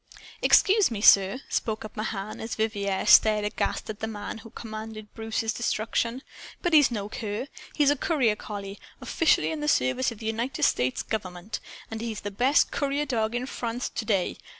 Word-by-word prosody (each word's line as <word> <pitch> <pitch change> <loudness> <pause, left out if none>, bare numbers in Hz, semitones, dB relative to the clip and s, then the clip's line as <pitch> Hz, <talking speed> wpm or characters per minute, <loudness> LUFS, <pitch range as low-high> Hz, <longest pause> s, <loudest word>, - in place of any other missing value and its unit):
"Excuse 405 -3 +5
me, 225 -4 -4
sir," 200 +3 +6
spoke 220 -1 -2
up 215 - -10
Mahan, 215 -1 -4
as 225 - -4
Vivier 205 -3 -1
stared 215 -1 +6
aghast 210 - -2
at 215 -1 -6
the 220 - -3
man 215 0 -6
who 225 - -12
commanded 215 -1 -8
Bruce's 225 0 -2
destruction, 230 +2 -1 0.4
"but 350 - 0
he's 295 -3 +7
no 210 -4 -3
cur. 215 +2 -4 0.3
He's 290 -2 +4
a - - +2
courier 265 - +1
collie, 200 -2 -7 0.2
officially 160 - +2
in 160 - -4
the 150 - -3
service 140 - +2
of 230 - -9
the 220 - -9
United 230 +4 -2
States 125 +1 +1
Government. 195 -1 -4 0.3
And 225 0 -5
he's 225 -2 -4
the 205 - -5
best 255 +8 +3
courier 285 +1 -1
dog 230 -4 -1
in 245 +1 -1
France 240 -1 -4
to - - -4
day. 200 -4 0
220 Hz, 180 wpm, -26 LUFS, 205-240 Hz, 0.4 s, he's